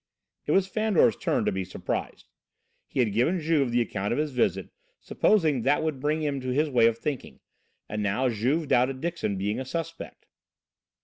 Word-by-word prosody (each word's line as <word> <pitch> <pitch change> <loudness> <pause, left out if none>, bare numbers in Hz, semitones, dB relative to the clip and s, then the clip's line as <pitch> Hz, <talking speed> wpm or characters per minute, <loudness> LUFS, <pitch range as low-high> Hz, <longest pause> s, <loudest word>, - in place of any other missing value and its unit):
It - - +1
was 190 -1 +4
Fandor's 205 - +2
turn - - -1
to - - +2
be 95 0 -2
surprised. 90 - -5 0.6
He 130 - 0
had 110 -5 0
given 140 - +2
Juve 155 -5 +1
the 120 0 +2
account 100 -3 -2
of 120 - 0
his 150 0 -1
visit, 125 - 0 0.3
supposing 160 - +2
that 140 +6 +2
would 155 -4 -2
bring 150 +3 0
him 140 -2 -1
to 130 - -4
his 145 +4 +1
way 120 -3 +5
of 115 -1 0
thinking, 140 +2 -5 0.5
and 105 0 -3
now 105 +6 +1
Juve 130 +7 0
doubted 130 +2 +2
Dixon 165 - -2
being 105 +4 -2
a - - -3
suspect. 165 +4 -6
130 Hz, 185 wpm, -26 LUFS, 115-155 Hz, 0.6 s, way